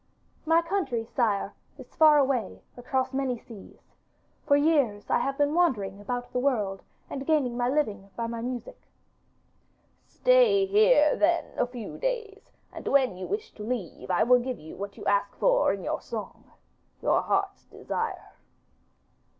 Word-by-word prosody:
'My 330 +1 +4
country, 330 - -2
sire, 225 -5 -1 0.2
is - - -13
far 310 -1 +6
away 260 -7 0
across 260 +2 -2
many 265 -2 -1
seas. 225 -3 -15 0.5
For 285 - +5
years 285 -9 +1
I - - +3
have 275 0 -2
been 290 0 +2
wandering 215 - +1
about 245 +3 -5
the 250 - 0
world 210 -8 0 0.3
and 270 0 -6
gaining 285 -7 +1
my 245 0 0
living 215 -9 -1
by 230 - -3
my 230 0 -4
music.' 255 - -6 1.2
'Stay - - +4
here 405 -6 +4
then 340 +2 +1
a - - 0
few 245 -3 -8
days, 460 -5 -4 0.2
and - - -8
when 260 -8 +3
you 185 - -6
wish 425 +2 -4
to 210 - -9
leave 220 -8 -5
I 180 +3 +3
will 250 +2 +5
give 250 0 -4
you 155 - -11
what 200 +1 -7
you - - -9
ask 200 0 +1
for - - +3
in - - -4
your - - -2
song - - -7 0.6
your - - +3
heart's 395 0 -1
desire. - - -5
260 Hz, 160 wpm, -27 LUFS, 225-330 Hz, 1.2 s, far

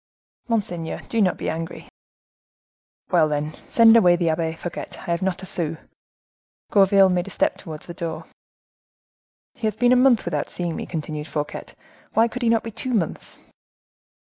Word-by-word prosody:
"Monseigneur, 180 -8 -2
do 230 - +1
not 185 -3 +2
be - - -5
angry." 165 +1 -5 1.2
"Well, 165 -4 +4
then, 150 +1 -2 0.2
send 230 -1 +7
away 180 -6 +6
the 170 -2 +1
Abbe 160 0 -1
Fouquet; 170 +1 -6
I 180 - -5
have 170 +1 0
not 190 0 -2
a - - -5
sou." 165 -3 -2 0.9
Gourville 195 -2 +5
made 180 0 0
a - - -5
step - - 0
towards 155 -3 -9
the 170 - -8
door. 165 -1 -5 1.3
"He 230 -3 -2
has 215 - -2
been 245 +2 +4
a - - +5
month 250 -3 +4
without - - -2
seeing 175 -2 -3
me," - - -5
continued 155 -2 -5
Fouquet, 150 0 -4 0.5
"why 225 +1 +4
could 250 +2 -6
he 235 - +2
not 230 -1 +2
be 230 - -6
two 245 +3 -3
months?" 175 -7 -3
180 Hz, 170 wpm, -23 LUFS, 160-220 Hz, 1.3 s, send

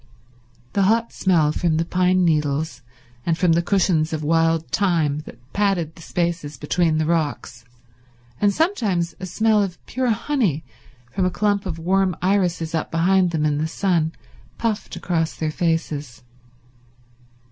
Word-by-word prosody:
The 200 - +2
hot 230 +1 +1
smell 165 -6 +2
from 160 0 0
the 165 - 0
pine 185 +1 +2
needles 150 -2 0 0.4
and 165 -1 0
from 175 0 +3
the 165 +1 +3
cushions 170 -4 +1
of 155 -1 -3
wild 165 +1 +2
thyme 165 -7 +1
that - - -10 0.2
padded 195 -6 0
the 165 - -15
spaces 165 -4 -2
between 160 +3 +1
the 155 - +1
rocks, 150 -6 -2 0.8
and 205 - +4
sometimes 205 - 0
a 185 - -5
smell 220 +3 +2
of 190 -3 -2
pure 255 0 -1
honey 220 - 0 0.5
from 185 +8 0
a - - +3
clump 205 +1 0
of 165 -3 -4
warm 185 +2 +1
irises 180 -4 0
up 160 - -1
behind 180 +2 +3
them 160 -2 -1
in 150 -1 +1
the 155 - 0
sun, 165 -2 0 0.4
puffed 225 -2 -2
across 165 -2 -1
their 155 -1 -2
faces. 150 -7 -2
170 Hz, 150 wpm, -22 LUFS, 160-195 Hz, 0.8 s, and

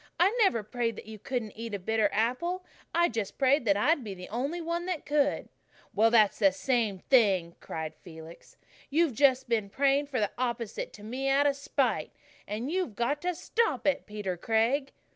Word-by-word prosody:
I 390 +6 +4
never 305 - +3
prayed 230 +1 -2
that - - -10
you 215 0 -10
couldn't 240 -2 -3
eat 225 0 -6
a - - -1
bitter 215 +2 +1
apple. 340 - -1 0.3
I 345 0 +3
just 225 - -4
prayed 270 0 +3
that 200 -2 +3
I'd 290 +6 +2
be 200 -3 -6
the 180 0 -10
only 275 - -2
one 340 +1 -3
that 360 -5 -3
could." 290 -1 +1 0.5
"Well, 220 +3 +4
that's 220 -3 +4
the 195 -3 +5
same 230 -6 0
thing," 190 -7 +2
cried 160 -1 -5
Felix. 160 -1 -13 0.3
"You've 315 -1 +2
just 265 +1 +3
been 220 -4 0
praying 280 +5 +2
for 265 -4 -2
the 205 -2 0
opposite 235 -3 -3
to 210 - -12
me 255 +5 -2
out 275 +1 +3
of 285 -1 +3
spite. 260 - -1 0.3
And 225 +8 -3
you've 360 - -2
got 280 +6 -1
to 360 0 -1
stop 450 - 0
it, 290 - +1
Peter 205 -4 -4
Craig." 230 - +1
240 Hz, 190 wpm, -29 LUFS, 210-285 Hz, 0.5 s, the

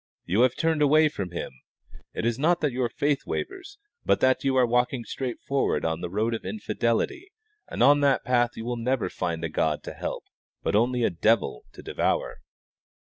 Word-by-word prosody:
You 100 +7 +2
have 125 -1 +4
turned 160 -2 +1
away 155 +2 +5
from 100 -10 -5
Him. 85 - -5 0.6
It - - -2
is 120 +1 0
not 170 +4 +3
that 150 -3 +1
your 125 -1 -1
faith 140 +4 -1
wavers, 385 +1 -5 0.3
but - - +2
that 130 0 +2
you 135 -1 +1
are 130 -1 +5
walking 125 +1 +1
straight 125 0 -5
forward 140 -1 0
on 80 +1 -1
the 90 - -4
road 110 +5 0
of 115 - -4
infidelity, 220 - -2 0.4
and - - -1
on 145 +1 +6
that 140 -1 +2
path 120 -1 +1
you 115 - -6
will 120 0 -2
never 115 -4 -1
find 85 -2 -3
a - - 0
God 75 0 0
to - - -7
help, - - -5 0.4
but - - 0
only 120 +3 +2
a - - +2
devil 105 - +1
to - - -12
devour." - - -1
125 Hz, 195 wpm, -26 LUFS, 110-145 Hz, 0.6 s, on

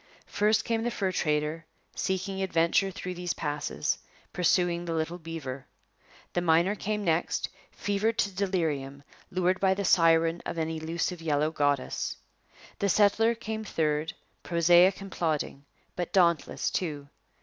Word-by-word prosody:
First 210 +1 +1
came 230 -1 0
the 240 - 0
fur 195 -5 -1
trader, 150 -1 -1 0.3
seeking 190 0 -2
adventure 180 +1 +2
through 185 -1 -5
these 175 -1 -3
passes, 145 - -2 0.3
pursuing 175 -1 +2
the 165 -1 -2
little 165 +2 -2
beaver. 150 -5 -6 0.7
The 175 - +1
miner 170 +3 +3
came 210 0 -3
next, 165 -2 0 0.2
fevered 210 +3 -1
to 205 - +1
delirium, 160 -8 -2 0.3
lured 185 +1 +1
by 190 -1 +3
the 200 0 -2
siren 165 -1 +4
of - - -5
an 160 0 -1
elusive 165 +2 -3
yellow 155 -1 +1
goddess. 145 -3 0 0.6
The 200 - +1
settler 215 +4 +4
came 220 -1 -5
third, 155 -5 -1 0.3
prosaic 175 +2 +4
and 195 -1 -8
plodding, 150 -4 -2 0.3
but 175 -2 -3
dauntless 170 -4 +2
too. 150 -6 -3
175 Hz, 140 wpm, -28 LUFS, 160-195 Hz, 0.7 s, siren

